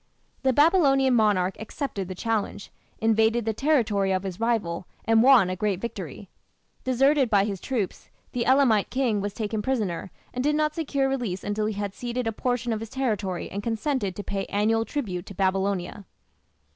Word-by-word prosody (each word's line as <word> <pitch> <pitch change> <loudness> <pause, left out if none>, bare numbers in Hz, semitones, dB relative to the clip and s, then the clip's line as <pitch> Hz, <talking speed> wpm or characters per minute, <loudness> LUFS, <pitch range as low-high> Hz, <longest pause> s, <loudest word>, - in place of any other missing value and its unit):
The 265 - +3
Babylonian 275 -3 +4
monarch 205 -5 +2
accepted 220 - -4
the 185 - -6
challenge, 215 -1 -2 0.3
invaded 225 +1 +2
the 220 - 0
territory 220 -8 +1
of 190 0 0
his 190 -1 -5
rival, 205 -7 -1 0.2
and 225 0 +4
won 250 -6 +7
a 185 - -2
great 195 -1 -1
victory. 235 +3 -6 0.6
Deserted 270 +1 +3
by 200 -2 +4
his 200 -3 -4
troops, 220 -9 -3 0.2
the 245 - -1
Elamite 255 -6 +4
king 245 -6 0
was 205 0 -4
taken 215 -1 -2
prisoner, 210 -8 -2 0.2
and 250 - -2
did 300 +1 +2
not 305 0 +1
secure 280 -4 0
release 240 -9 -2
until 210 +1 -1
he 215 - -3
had 205 -1 -3
ceded 245 +1 -3
a 225 - 0
portion 245 +1 -1
of 220 - -2
his 225 0 -7
territory 210 -9 -2
and 200 - -3
consented 225 - -1
to 205 - -5
pay 195 -1 -3
annual 225 +2 +1
tribute 200 -11 -4
to 200 - -9
Babylonia. 195 0 -1
220 Hz, 175 wpm, -26 LUFS, 200-255 Hz, 0.6 s, won